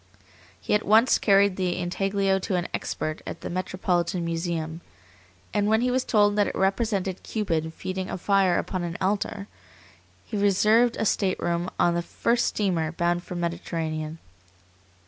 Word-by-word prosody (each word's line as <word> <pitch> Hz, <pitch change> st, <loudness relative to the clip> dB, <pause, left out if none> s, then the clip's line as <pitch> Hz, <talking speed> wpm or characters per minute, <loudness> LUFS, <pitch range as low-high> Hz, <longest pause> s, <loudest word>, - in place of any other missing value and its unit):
He -, -, -2 dB
at 210 Hz, -, +3 dB
once 225 Hz, +5 st, +5 dB
carried 200 Hz, -2 st, +4 dB
the 180 Hz, -2 st, -1 dB
intaglio 195 Hz, +2 st, 0 dB
to 190 Hz, 0 st, -2 dB
an 175 Hz, -1 st, -1 dB
expert 155 Hz, 0 st, -3 dB
at -, -, -6 dB
the -, -, -5 dB
Metropolitan 180 Hz, -1 st, -1 dB
Museum, 165 Hz, -1 st, -3 dB, 0.7 s
and 205 Hz, 0 st, +1 dB
when 220 Hz, +1 st, +3 dB
he 250 Hz, +1 st, +1 dB
was 255 Hz, 0 st, +1 dB
told 205 Hz, -2 st, +3 dB
that 205 Hz, -, +3 dB
it -, -, -4 dB
represented 195 Hz, -1 st, 0 dB
Cupid 165 Hz, -7 st, -2 dB
feeding 185 Hz, 0 st, -4 dB
a -, -, -3 dB
fire 195 Hz, -1 st, +2 dB
upon 185 Hz, -, -2 dB
an 170 Hz, -1 st, -4 dB
altar, 200 Hz, +1 st, -1 dB, 0.8 s
he 220 Hz, -, -6 dB
reserved 215 Hz, +4 st, +3 dB
a -, -, 0 dB
stateroom 180 Hz, -3 st, 0 dB
on 175 Hz, -, +3 dB
the 170 Hz, -, 0 dB
first 235 Hz, +7 st, 0 dB
steamer 175 Hz, -6 st, 0 dB
bound 175 Hz, 0 st, 0 dB
for 180 Hz, -, -7 dB
the 175 Hz, -, -3 dB
Mediterranean. 165 Hz, -2 st, -3 dB
185 Hz, 160 wpm, -25 LUFS, 170-205 Hz, 0.8 s, once